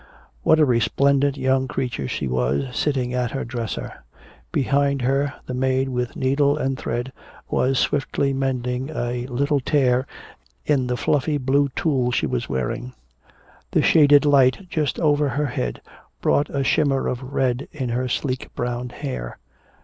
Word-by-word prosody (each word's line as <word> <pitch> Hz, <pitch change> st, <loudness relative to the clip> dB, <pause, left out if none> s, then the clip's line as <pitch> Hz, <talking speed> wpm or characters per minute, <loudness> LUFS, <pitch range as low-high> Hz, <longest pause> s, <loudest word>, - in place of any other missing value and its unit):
What 155 Hz, -, +4 dB
a 155 Hz, -, +6 dB
resplendent 140 Hz, +3 st, +2 dB
young 130 Hz, 0 st, +1 dB
creature 125 Hz, -, -3 dB
she -, -, -3 dB
was, 65 Hz, -, -1 dB
seated 130 Hz, -4 st, 0 dB
at 125 Hz, -1 st, 0 dB
her 135 Hz, -, -3 dB
dresser. 115 Hz, -, -5 dB, 0.5 s
Behind 140 Hz, 0 st, +1 dB
her 140 Hz, +3 st, +1 dB
the 125 Hz, -, -5 dB
maid 130 Hz, +1 st, +1 dB
with 125 Hz, -1 st, -3 dB
needle 140 Hz, +2 st, +2 dB
and 135 Hz, -2 st, -1 dB
thread 120 Hz, +1 st, -4 dB, 0.4 s
was 135 Hz, +1 st, +2 dB
swiftly 140 Hz, 0 st, 0 dB
mending 130 Hz, 0 st, -2 dB
a 120 Hz, -4 st, -3 dB
little 140 Hz, +3 st, 0 dB
tear 130 Hz, -2 st, +2 dB, 0.6 s
in 135 Hz, -4 st, +1 dB
the 125 Hz, 0 st, -1 dB
fluffy 145 Hz, +3 st, +1 dB
blue 140 Hz, +1 st, +2 dB
tulle 130 Hz, -6 st, +1 dB
she -, -, +1 dB
was 60 Hz, -, -2 dB
wearing. 115 Hz, -, -3 dB, 0.8 s
The -, -, +2 dB
shaded 145 Hz, -2 st, +6 dB
light 140 Hz, +4 st, +4 dB
just 150 Hz, -3 st, -1 dB
over 145 Hz, -2 st, +2 dB
her 150 Hz, +2 st, -1 dB
head 60 Hz, -, -3 dB, 0.4 s
brought 145 Hz, -, +2 dB
a 140 Hz, -1 st, -1 dB
shimmer 135 Hz, -1 st, +2 dB
of 125 Hz, -, -2 dB
red 130 Hz, -1 st, -1 dB
in 130 Hz, -5 st, -4 dB
her 125 Hz, +2 st, -1 dB
sleek 130 Hz, +1 st, -2 dB
brown 120 Hz, 0 st, -3 dB
hair. 120 Hz, -, -6 dB
130 Hz, 150 wpm, -22 LUFS, 125-140 Hz, 0.8 s, a